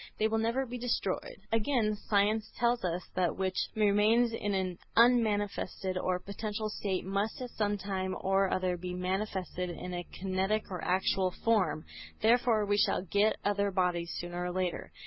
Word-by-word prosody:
They 215 Hz, -, +3 dB
will 220 Hz, 0 st, 0 dB
never 235 Hz, +4 st, 0 dB
be 245 Hz, 0 st, -6 dB
destroyed. 230 Hz, -5 st, -2 dB
Again 225 Hz, -1 st, +2 dB
science 210 Hz, +1 st, +1 dB
tells 240 Hz, 0 st, +2 dB
us 180 Hz, 0 st, -1 dB
that 185 Hz, -, -1 dB
that 175 Hz, -, +1 dB
which 190 Hz, -1 st, -1 dB
remains 215 Hz, +3 st, +4 dB
in 205 Hz, -3 st, -1 dB
an 185 Hz, -2 st, -2 dB, 0.2 s
unmanifested 210 Hz, -5 st, +2 dB
or 185 Hz, 0 st, 0 dB
potential 210 Hz, +3 st, -4 dB
state 190 Hz, -3 st, -2 dB
must 200 Hz, +3 st, -1 dB
at 250 Hz, -2 st, -6 dB
some 205 Hz, -1 st, 0 dB
time 190 Hz, -1 st, -3 dB
or 195 Hz, 0 st, +2 dB
other 185 Hz, -1 st, 0 dB
be 180 Hz, +1 st, -5 dB
manifested 185 Hz, -1 st, -2 dB
in 180 Hz, +1 st, -6 dB
a 175 Hz, 0 st, -3 dB
kinetic 195 Hz, +3 st, -1 dB
or 180 Hz, -3 st, -4 dB
actual 185 Hz, +1 st, +2 dB
form. 180 Hz, -7 st, +1 dB, 0.3 s
Therefore 225 Hz, -1 st, +3 dB
we 205 Hz, 0 st, +1 dB
shall -, -, +2 dB
get 205 Hz, +3 st, +2 dB
other 200 Hz, 0 st, +2 dB
bodies, 180 Hz, -3 st, 0 dB
sooner 175 Hz, 0 st, -4 dB
or 180 Hz, -, -2 dB
later. 185 Hz, -1 st, -2 dB
200 Hz, 165 wpm, -31 LUFS, 185-215 Hz, 0.3 s, remains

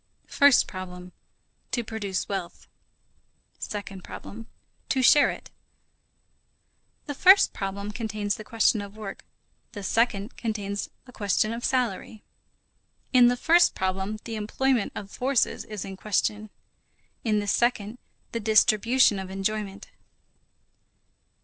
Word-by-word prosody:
First 285 Hz, -3 st, +5 dB
problem: 180 Hz, -1 st, -8 dB, 0.6 s
To 240 Hz, -, 0 dB
produce 205 Hz, -4 st, -3 dB
wealth. 190 Hz, -4 st, -5 dB, 0.9 s
Second 195 Hz, -3 st, -6 dB
problem: 225 Hz, +2 st, -9 dB, 0.4 s
To 260 Hz, -1 st, +1 dB
share 290 Hz, +4 st, +6 dB
it. -, -, -8 dB, 1.5 s
The 290 Hz, -, -4 dB
first 380 Hz, +7 st, +6 dB
problem 200 Hz, +1 st, -4 dB
contains 210 Hz, -2 st, -3 dB
the 215 Hz, -, -7 dB
question 220 Hz, -1 st, +2 dB
of 200 Hz, +1 st, -10 dB
work. 210 Hz, -3 st, -7 dB, 0.5 s
The 205 Hz, -, -7 dB
second 215 Hz, +1 st, 0 dB
contains 205 Hz, -3 st, -3 dB, 0.2 s
the 250 Hz, -, -14 dB
question 215 Hz, 0 st, 0 dB
of 235 Hz, +1 st, -6 dB
salary. 230 Hz, -4 st, -1 dB, 0.9 s
In 250 Hz, -1 st, +7 dB
the 245 Hz, 0 st, +2 dB
first 340 Hz, +6 st, +4 dB
problem 190 Hz, +3 st, -2 dB
the 225 Hz, -2 st, -5 dB
employment 240 Hz, +2 st, 0 dB
of 200 Hz, -1 st, -7 dB
forces 260 Hz, 0 st, 0 dB
is 210 Hz, -3 st, -6 dB
in 195 Hz, -1 st, -7 dB
question. 210 Hz, +1 st, -1 dB, 0.7 s
In 215 Hz, -2 st, +1 dB
the 205 Hz, -, -1 dB
second, 230 Hz, +1 st, 0 dB, 0.3 s
the 230 Hz, -, -2 dB
distribution 220 Hz, +1 st, +4 dB
of 190 Hz, -1 st, -6 dB
enjoyment. 195 Hz, +1 st, -4 dB
215 Hz, 120 wpm, -26 LUFS, 200-235 Hz, 1.5 s, In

